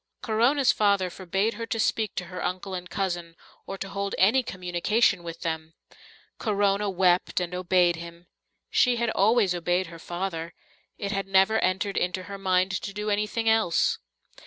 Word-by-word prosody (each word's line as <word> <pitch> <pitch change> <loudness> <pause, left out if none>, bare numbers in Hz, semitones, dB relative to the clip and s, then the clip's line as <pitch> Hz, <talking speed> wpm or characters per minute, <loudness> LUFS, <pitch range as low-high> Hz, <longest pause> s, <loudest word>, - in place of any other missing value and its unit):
Corona's 245 +4 +3
father 200 -3 +2
forbade 195 +5 -1
her 230 -1 -6
to 225 - -2
speak 215 -1 0
to 180 - -3
her 180 +1 -6
uncle 185 +1 -3
and 180 0 -5
cousin 175 -4 -3 0.3
or 195 - -5
to 195 - -5
hold 200 0 -3
any 220 +8 +4
communication 185 0 +1
with 170 -1 -8
them. 160 -1 -4 0.6
Corona 205 -1 +1
wept 185 -1 +2
and 180 0 -3
obeyed 180 -1 +2
him. 170 +1 -10 0.5
She 250 -1 +4
had 235 -1 0
always 210 -2 +3
obeyed 175 +1 0
her 165 - -10
father; 175 -1 -4 0.4
it 200 -1 -3
had 195 -1 -2
never 195 +3 +4
entered 190 +2 0
into 180 +1 -1
her 200 +1 -8
mind 185 0 +2
to 200 - -6
do 210 +1 -2
anything 210 +2 -1
else. 220 -6 +2
190 Hz, 165 wpm, -26 LUFS, 180-210 Hz, 0.6 s, any